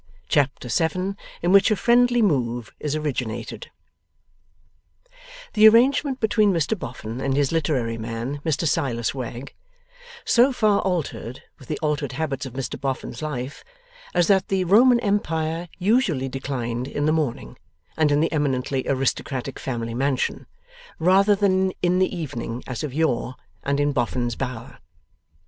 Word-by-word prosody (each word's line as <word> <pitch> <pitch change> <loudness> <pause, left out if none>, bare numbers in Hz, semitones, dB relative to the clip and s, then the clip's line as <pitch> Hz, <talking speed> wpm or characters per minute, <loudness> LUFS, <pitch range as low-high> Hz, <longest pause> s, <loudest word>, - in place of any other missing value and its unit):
Chapter 135 -3 +1
7 180 +8 0 0.3
IN 175 - +2
WHICH 195 0 +6
A 215 - +3
FRIENDLY 240 +2 +3
MOVE 120 - 0
IS 150 0 -2
ORIGINATED 135 -7 -4 1.8
The 215 0 +8
arrangement 265 +4 +4
between 215 -1 +3
Mr 165 +3 0
Boffin 120 - -7
and 135 0 0
his 145 -2 +2
literary 130 -8 0
man, 115 +5 -4
Mr 160 0 0
Silas 120 -5 0
Wegg, 125 0 -6 0.7
so 250 +3 +5
far 215 -5 +2
altered 160 -9 -3 0.2
with 130 - -14
the 150 - -3
altered 150 -1 -1
habits 140 -4 -3
of 125 - -10
Mr 130 0 -5
Boffin's 135 -3 -4
life, 140 -3 -5 0.5
as 175 - +4
that 190 -1 +3
the 190 -1 +1
Roman 235 +7 +5
Empire 165 -5 -1
usually 185 - +1
declined 125 -2 -3
in 145 +1 -2
the 155 - +3
morning 155 -6 -2 0.4
and 155 -2 +2
in 145 +1 +3
the 165 - +1
eminently 135 -3 0
aristocratic 135 0 -2
family 115 -3 -4
mansion, 130 +1 -1 0.5
rather 195 +5 +4
than 190 -2 +2
in 180 +1 +3
the 185 - +3
evening, 125 -7 -5
as 125 +1 -5
of 150 - -3
yore, 130 -4 0 0.3
and 140 +1 -1
in 145 0 +2
Boffin's 120 -2 -1
Bower. 125 -3 -6
145 Hz, 145 wpm, -23 LUFS, 130-185 Hz, 1.8 s, The